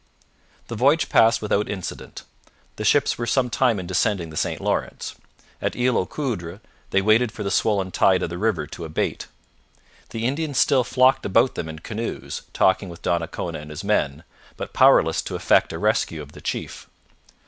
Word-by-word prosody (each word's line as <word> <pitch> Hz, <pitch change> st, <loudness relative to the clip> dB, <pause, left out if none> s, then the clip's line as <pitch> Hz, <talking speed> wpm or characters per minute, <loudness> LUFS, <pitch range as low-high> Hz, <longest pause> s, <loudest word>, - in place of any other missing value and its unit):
The 115 Hz, -, -5 dB
voyage 140 Hz, +8 st, +3 dB
passed 115 Hz, 0 st, +4 dB
without 105 Hz, 0 st, 0 dB
incident. 95 Hz, -4 st, -6 dB, 0.5 s
The -, -, -4 dB
ships -, -, +2 dB
were 120 Hz, -, -2 dB
some 125 Hz, +1 st, +1 dB
time 120 Hz, -6 st, +2 dB
in 90 Hz, -, -6 dB
descending 90 Hz, -2 st, 0 dB
the -, -, -10 dB
St -, -, -1 dB
Lawrence. -, -, -2 dB, 0.5 s
At -, -, -2 dB
Isle 125 Hz, 0 st, +1 dB
aux 90 Hz, -, +1 dB
Coudres 100 Hz, -, -4 dB, 0.3 s
they 95 Hz, -, +2 dB
waited 110 Hz, +3 st, +3 dB
for 110 Hz, -2 st, -6 dB
the 100 Hz, -, -2 dB
swollen 100 Hz, -2 st, +1 dB
tide 95 Hz, 0 st, +3 dB
of 85 Hz, -, -3 dB
the 85 Hz, -, -5 dB
river 100 Hz, -8 st, 0 dB
to 85 Hz, +3 st, -9 dB
abate. 80 Hz, -1 st, -3 dB, 0.8 s
The 115 Hz, 0 st, -4 dB
Indians 145 Hz, +2 st, -1 dB
still 130 Hz, -3 st, +4 dB
flocked 130 Hz, +2 st, +3 dB
about 115 Hz, +6 st, +3 dB
them 80 Hz, -, -5 dB
in 80 Hz, -, -7 dB
canoes, 110 Hz, +8 st, -5 dB
talking 95 Hz, 0 st, +2 dB
with 85 Hz, 0 st, -11 dB
Donnacona 85 Hz, -3 st, -2 dB
and 75 Hz, 0 st, -10 dB
his 75 Hz, +4 st, -7 dB
men, 80 Hz, -7 st, 0 dB, 0.3 s
but -, -, -6 dB
powerless -, -, +5 dB
to -, -, -6 dB
effect -, -, +3 dB
a -, -, -5 dB
rescue 80 Hz, -2 st, 0 dB
of 70 Hz, -, -14 dB
the -, -, -13 dB
chief. -, -, -5 dB
105 Hz, 180 wpm, -23 LUFS, 85-120 Hz, 0.8 s, powerless